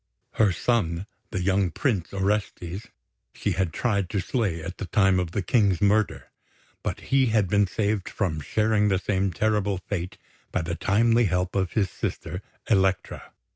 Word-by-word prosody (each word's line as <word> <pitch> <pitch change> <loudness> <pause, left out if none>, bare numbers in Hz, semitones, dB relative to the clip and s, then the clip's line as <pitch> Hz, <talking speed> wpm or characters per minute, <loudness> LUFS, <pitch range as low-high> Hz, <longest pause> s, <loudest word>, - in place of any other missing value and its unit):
Her 105 -3 +3
son, 90 -3 0 0.2
the 95 - -2
young 95 0 +2
Prince 95 - -1
Orestes, 100 -1 -2 0.5
she - - -1
had 95 -4 0
tried 100 -1 0
to 100 - -1
slay 100 -5 -1
at 90 +2 -7
the 95 - -4
time 95 +1 +3
of 90 -2 -1
the 95 +3 -2
King's 100 -3 +3
murder; 105 +2 +1 0.5
but - - -3
he 135 -1 +5
had 110 -4 +2
been 100 +2 +3
saved 105 +1 -1
from 80 -8 -2
sharing 105 +6 +2
the 95 -2 +3
same 95 0 0
terrible 105 0 +1
fate 90 -1 -4 0.3
by 90 - 0
the 85 +1 -3
timely 115 +6 +3
help 90 0 0
of 95 -3 0
his 100 -5 +1
sister, 90 - -4 0.3
Elektra. 95 -3 +1
95 Hz, 165 wpm, -26 LUFS, 90-105 Hz, 0.5 s, he